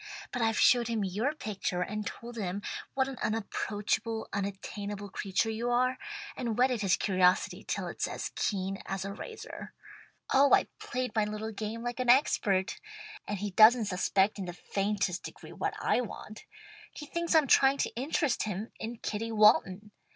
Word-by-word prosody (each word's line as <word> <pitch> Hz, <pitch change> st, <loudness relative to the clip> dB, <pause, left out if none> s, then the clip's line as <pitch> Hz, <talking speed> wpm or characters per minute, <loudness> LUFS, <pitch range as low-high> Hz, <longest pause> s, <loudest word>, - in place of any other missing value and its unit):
But 245 Hz, -, -2 dB
I've 225 Hz, -1 st, +2 dB
showed 240 Hz, -2 st, +5 dB
him 225 Hz, -3 st, -1 dB
your 215 Hz, +11 st, -1 dB
picture 195 Hz, -7 st, -2 dB
and 210 Hz, +2 st, -4 dB
told 240 Hz, +1 st, -8 dB
him 200 Hz, -2 st, -3 dB, 0.3 s
what 265 Hz, -1 st, +2 dB
an 270 Hz, -2 st, -7 dB
unapproachable, 220 Hz, +1 st, -2 dB
unattainable 200 Hz, 0 st, -4 dB
creature 200 Hz, +3 st, 0 dB
you 230 Hz, +2 st, -2 dB
are, 255 Hz, +1 st, +2 dB, 0.4 s
and 235 Hz, -4 st, -3 dB
whetted 250 Hz, -2 st, +2 dB
his 195 Hz, -3 st, +3 dB
curiosity 185 Hz, -2 st, +2 dB
till -, -, -3 dB
it's -, -, -2 dB
as -, -, -4 dB
keen 195 Hz, -1 st, -2 dB
as 195 Hz, 0 st, -3 dB
a 200 Hz, -, -4 dB
razor. 445 Hz, -, -9 dB, 0.6 s
Oh 275 Hz, +1 st, +6 dB
I've -, -, +3 dB
played 250 Hz, 0 st, -3 dB
my 215 Hz, -, +2 dB
little 215 Hz, +1 st, -4 dB
game 220 Hz, +2 st, -5 dB
like 240 Hz, +1 st, -4 dB
an 250 Hz, -1 st, 0 dB
expert, 205 Hz, -7 st, +3 dB, 0.5 s
and 205 Hz, -, -2 dB
he 205 Hz, +1 st, -3 dB
doesn't 220 Hz, +3 st, +7 dB
suspect 195 Hz, +2 st, +1 dB
in 190 Hz, -, -3 dB
the 175 Hz, -, -5 dB
faintest 195 Hz, 0 st, -1 dB
degree -, -, -10 dB
what -, -, -2 dB
I -, -, +2 dB
want. 215 Hz, -2 st, -8 dB, 0.5 s
He 300 Hz, -, -8 dB
thinks 340 Hz, +2 st, -1 dB
I'm 315 Hz, -2 st, +6 dB
trying 270 Hz, +1 st, +5 dB
to -, -, -1 dB
interest 275 Hz, +1 st, 0 dB
him 210 Hz, +1 st, -3 dB
in 230 Hz, +2 st, -5 dB
Kitty 225 Hz, +2 st, -3 dB
Walton. 210 Hz, -1 st, +4 dB
215 Hz, 170 wpm, -30 LUFS, 200-240 Hz, 0.6 s, doesn't